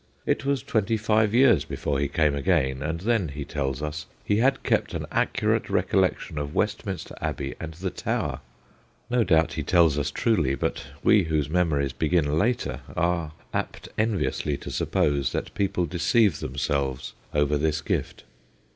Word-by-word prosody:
It -, -, 0 dB
was 140 Hz, -4 st, 0 dB
twenty 110 Hz, 0 st, +1 dB
five 110 Hz, -1 st, +2 dB
years 120 Hz, -3 st, +5 dB
before 70 Hz, -2 st, -2 dB
he 70 Hz, -, +1 dB
came 75 Hz, +1 st, +2 dB
again, 70 Hz, -3 st, +1 dB
and 80 Hz, +2 st, -3 dB
then, 110 Hz, -3 st, +1 dB
he 70 Hz, 0 st, -6 dB
tells 70 Hz, -1 st, -3 dB
us, 75 Hz, 0 st, -4 dB, 0.2 s
he 105 Hz, -, +2 dB
had 130 Hz, +5 st, +2 dB
kept -, -, 0 dB
an -, -, -3 dB
accurate -, -, +1 dB
recollec -, -, +2 dB
tion 75 Hz, -, -6 dB
of 70 Hz, +1 st, -5 dB
Westminster 105 Hz, -3 st, -2 dB
Abbey 70 Hz, -1 st, -3 dB
and 80 Hz, -1 st, -6 dB
the 95 Hz, +2 st, -3 dB
Tower. -, -, -2 dB, 0.7 s
(No 125 Hz, -1 st, +3 dB
doubt 80 Hz, -5 st, +3 dB
he -, -, -2 dB
tells 80 Hz, -5 st, +3 dB
us 70 Hz, -, -1 dB
truly, 80 Hz, -, +1 dB
but 70 Hz, -, -3 dB, 0.2 s
we 105 Hz, -4 st, +5 dB
whose 75 Hz, -2 st, -1 dB
memories 75 Hz, -6 st, +1 dB
begin 80 Hz, -1 st, +1 dB
later 120 Hz, +5 st, 0 dB, 0.2 s
are 85 Hz, -2 st, 0 dB, 0.2 s
apt -, -, -4 dB
enviously 100 Hz, -9 st, 0 dB
to -, -, -6 dB
suppose 70 Hz, -3 st, +1 dB
that -, -, -3 dB
people 95 Hz, -3 st, 0 dB
deceive 90 Hz, +3 st, +2 dB
themselves 65 Hz, 0 st, -2 dB, 0.2 s
over 75 Hz, 0 st, +2 dB
this 75 Hz, +1 st, 0 dB
gift.) -, -, -3 dB
80 Hz, 165 wpm, -25 LUFS, 70-105 Hz, 0.7 s, years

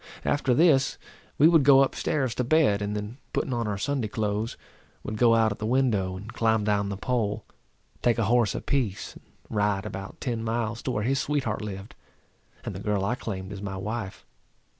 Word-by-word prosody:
After 135 Hz, -3 st, +2 dB
this 145 Hz, -4 st, +4 dB, 0.4 s
we 150 Hz, -, +7 dB
would 165 Hz, -2 st, +6 dB
go 135 Hz, 0 st, +7 dB
up 135 Hz, -, -1 dB
stairs 130 Hz, -6 st, -1 dB
to 125 Hz, -, -1 dB
bed, 125 Hz, -7 st, +3 dB
and 105 Hz, 0 st, -2 dB
then 105 Hz, +5 st, -5 dB
putting 130 Hz, -, -1 dB
on 120 Hz, -2 st, -1 dB
our 105 Hz, -1 st, -2 dB
Sunday 130 Hz, +1 st, -1 dB
clothes, 105 Hz, 0 st, -2 dB, 0.5 s
would 110 Hz, -, -4 dB
go 115 Hz, +1 st, +5 dB
out 110 Hz, -1 st, +3 dB
at 100 Hz, -, -5 dB
the 110 Hz, -, -3 dB
window, 110 Hz, -7 st, +1 dB
and 105 Hz, +4 st, -9 dB
climb 110 Hz, -2 st, +2 dB
down 100 Hz, -1 st, +1 dB
the 100 Hz, -, -4 dB
pole, 110 Hz, -2 st, -1 dB, 0.6 s
take 120 Hz, -2 st, +2 dB
a 115 Hz, -, +1 dB
horse 115 Hz, -2 st, +2 dB
apiece, 125 Hz, -9 st, -2 dB
and -, -, -16 dB, 0.3 s
ride 105 Hz, -1 st, +1 dB
about 95 Hz, -2 st, -7 dB
ten 115 Hz, -3 st, -2 dB
miles 115 Hz, 0 st, -2 dB
to -, -, -4 dB
where 105 Hz, -, -1 dB
his 135 Hz, +4 st, +1 dB
sweetheart 135 Hz, -8 st, -1 dB
lived, 100 Hz, -1 st, -7 dB, 0.7 s
and -, -, -4 dB
the -, -, -6 dB
girl 100 Hz, -2 st, 0 dB
I 100 Hz, -, +1 dB
claimed 100 Hz, -5 st, -5 dB
as 100 Hz, -, -7 dB
my 100 Hz, -1 st, -4 dB
wife. 105 Hz, +1 st, -5 dB
110 Hz, 200 wpm, -26 LUFS, 105-125 Hz, 0.7 s, we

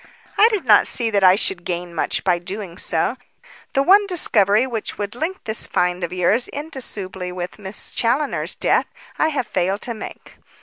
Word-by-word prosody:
"I 435 Hz, +3 st, +6 dB
do 425 Hz, -4 st, -1 dB
not 220 Hz, -7 st, +5 dB
see 230 Hz, -2 st, +2 dB
that 200 Hz, -2 st, +1 dB
I 185 Hz, 0 st, +7 dB
should 190 Hz, -3 st, +1 dB
gain 175 Hz, 0 st, -4 dB
much 165 Hz, -, -1 dB
by 180 Hz, -2 st, +2 dB
doing 185 Hz, 0 st, -7 dB
so. 170 Hz, +9 st, 0 dB, 0.6 s
The 275 Hz, -, +2 dB
one 400 Hz, +5 st, +5 dB
discovery 220 Hz, -, +3 dB
which 230 Hz, -4 st, -5 dB
would 205 Hz, 0 st, -4 dB
link 325 Hz, +10 st, -4 dB
this 220 Hz, 0 st, -1 dB
find 180 Hz, 0 st, 0 dB
of 170 Hz, -, -3 dB
yours 185 Hz, +7 st, +2 dB
indissolubly 205 Hz, -, -5 dB
with 180 Hz, +2 st, -6 dB
Miss 195 Hz, 0 st, -5 dB
Challoner's 260 Hz, +6 st, 0 dB
death, -, -, +1 dB, 0.3 s
I -, -, +3 dB
have 285 Hz, -6 st, -2 dB
failed 190 Hz, +2 st, -1 dB
to 235 Hz, -, -2 dB
make. 220 Hz, -, -10 dB
210 Hz, 180 wpm, -20 LUFS, 180-260 Hz, 0.6 s, I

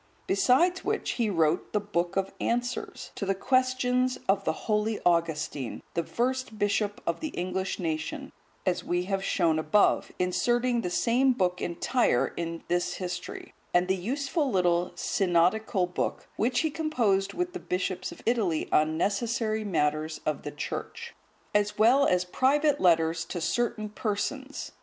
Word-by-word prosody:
Besides 265 Hz, -, +3 dB
which, -, -, -1 dB
he 230 Hz, -3 st, 0 dB
wrote 165 Hz, -3 st, +1 dB
the 210 Hz, -, +3 dB
"Book 180 Hz, -3 st, -2 dB
of 195 Hz, 0 st, 0 dB
Answers,"(152) 245 Hz, +1 st, -2 dB
to -, -, -3 dB
the 195 Hz, -, +1 dB
questions 255 Hz, +2 st, +1 dB
of 195 Hz, +1 st, +2 dB
the -, -, +2 dB
holy 215 Hz, 0 st, 0 dB
Augustine, 160 Hz, -6 st, 0 dB
the 170 Hz, -, 0 dB
first 255 Hz, +2 st, -2 dB
bishop 205 Hz, 0 st, 0 dB
of 170 Hz, -, -1 dB
the 315 Hz, -, -3 dB
English 185 Hz, -4 st, -3 dB
nation, 160 Hz, -3 st, -3 dB, 0.3 s
as 180 Hz, -1 st, 0 dB
we 175 Hz, 0 st, 0 dB
have 195 Hz, +1 st, -2 dB
shown 165 Hz, -5 st, +2 dB
above, 160 Hz, +7 st, +3 dB
inserting 240 Hz, +6 st, +1 dB
the 180 Hz, -, -2 dB
same 250 Hz, +8 st, +3 dB
book 180 Hz, -5 st, 0 dB
entire 175 Hz, -, +1 dB
in 165 Hz, -1 st, -4 dB
this 175 Hz, 0 st, 0 dB
history; 180 Hz, -2 st, -6 dB, 0.2 s
and 175 Hz, +1 st, +4 dB
the 190 Hz, -, +2 dB
useful 275 Hz, -, -1 dB
little 180 Hz, -4 st, +2 dB
"Synodical 185 Hz, +2 st, +2 dB
Book,"(153) 180 Hz, -, -3 dB
which 245 Hz, +3 st, +1 dB
he 315 Hz, -, 0 dB
composed 230 Hz, -12 st, 0 dB
with 355 Hz, 0 st, -2 dB
the 365 Hz, -, -4 dB
bishops 185 Hz, -, -2 dB
of -, -, -12 dB
Italy 210 Hz, -9 st, +1 dB
on 155 Hz, +1 st, +3 dB
necessary 220 Hz, +3 st, 0 dB
matters 155 Hz, -4 st, 0 dB
of 155 Hz, -2 st, -1 dB
the -, -, -5 dB
Church; 465 Hz, -, -6 dB, 0.4 s
as 210 Hz, 0 st, +1 dB
well 250 Hz, +6 st, +5 dB
as 180 Hz, 0 st, +2 dB
private 285 Hz, +8 st, +2 dB
letters 165 Hz, -2 st, +3 dB
to 175 Hz, -, -5 dB
certain 215 Hz, +5 st, -1 dB
persons. 220 Hz, +6 st, -3 dB
200 Hz, 150 wpm, -28 LUFS, 175-245 Hz, 0.4 s, well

